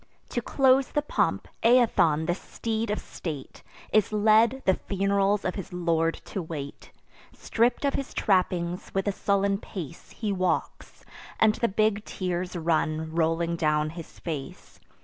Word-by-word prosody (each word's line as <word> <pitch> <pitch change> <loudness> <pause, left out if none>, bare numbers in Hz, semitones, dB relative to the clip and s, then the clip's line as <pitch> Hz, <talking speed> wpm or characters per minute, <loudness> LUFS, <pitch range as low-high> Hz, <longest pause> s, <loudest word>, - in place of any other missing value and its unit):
To 240 - -2
close 265 +1 +3
the 295 - -1
pomp, - - 0
Aethon, 225 -10 +4
the 175 - +1
steed 220 +4 -3
of 210 - 0
state, 150 -6 -7 0.3
Is 215 -2 +3
led, 220 +4 +4
the 190 - +5
fun'rals 200 +1 0
of 185 - 0
his 195 - -7
lord 165 -2 +1
to 195 - -4
wait. 150 -4 -7 0.4
Stripp'd 235 +5 0
of 280 - +1
his 275 - -3
trappings, 180 -3 0
with 195 +1 0
a - - +3
sullen 200 0 +1
pace 180 -10 -8
He 215 -3 -3
walks; 185 -1 -2 0.3
and 220 -1 +5
the 235 - 0
big 215 0 +1
tears 180 -2 -3
run 160 -1 0
rolling 165 +1 +1
down 155 -1 +1
his 165 -1 -10
face. 150 -5 -7
190 Hz, 150 wpm, -27 LUFS, 165-215 Hz, 0.4 s, the